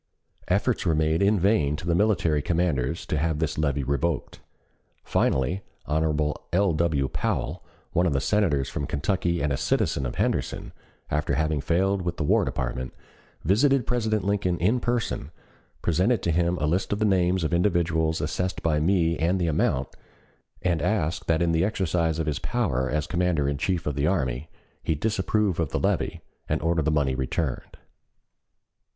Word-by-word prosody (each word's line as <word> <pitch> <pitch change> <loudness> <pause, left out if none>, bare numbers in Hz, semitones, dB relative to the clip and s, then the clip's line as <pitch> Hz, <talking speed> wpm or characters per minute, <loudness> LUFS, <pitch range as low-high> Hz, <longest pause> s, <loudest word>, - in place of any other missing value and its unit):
Efforts 100 +6 +1
were 85 -4 +2
made 80 +2 +1
in 100 +1 +3
vain 85 -7 +2
to 80 - -7
the 85 - +1
military 85 -6 +2
commanders 80 -3 0
to 75 - -1
have 80 0 0
this 80 -1 -2
levy 70 -2 0
revoked. 70 +5 -2 0.6
Finally 65 +9 +1 0.2
Hon. 75 -1 +1 0.2
L. 95 0 +2
W. 75 -4 +1
Powell, - - -2 0.3
one 90 +2 +3
of 80 - +1
the 70 - +2
Senators 75 -6 +1
from 70 - -4
Kentucky 85 +2 -1
and 75 -2 +1
a - - -1
citizen 65 0 0
of - - -6
Henderson, - - -2 0.4
after 75 0 0
having 80 -2 0
failed 95 +5 +1
with 85 -1 -3
the - - -1
War 75 - +3
Department, 65 0 -3 0.5
visited 130 - +3
President 110 -4 0
Lincoln 100 -3 0
in 105 +9 +2
person, 120 - -2 0.5
presented 95 +7 +2
to 85 - +1
him 85 +2 +1
a 75 - -1
list 85 +5 0
of 105 - +1
the 110 - +1
names 95 -2 +2
of 80 - -1
individuals 85 -3 +1
assessed 90 +4 -2
by 75 -2 +2
me 85 0 +2
and 90 +4 +1
the 90 - +1
amount, 70 -4 +1 0.7
and 85 -4 +1
asked 90 -3 -1
that 80 0 +2
in 85 - +2
the 80 0 +2
exercise 85 -5 0
of 80 - -1
his 75 -2 -1
power 75 - -1
as 75 0 -1
Commander 90 -5 0
in 70 -1 -1
Chief 90 -1 -1
of 75 - -1
the 70 +2 0
Army 75 -5 -1 0.3
he 80 - 0
disapprove 105 +1 0
of 80 -4 0
the - - -1
levy - - -1 0.3
and - - +1
order 85 0 +2
the 80 - +1
money 75 -4 +1
returned. 65 +1 -3
85 Hz, 175 wpm, -25 LUFS, 75-95 Hz, 0.7 s, in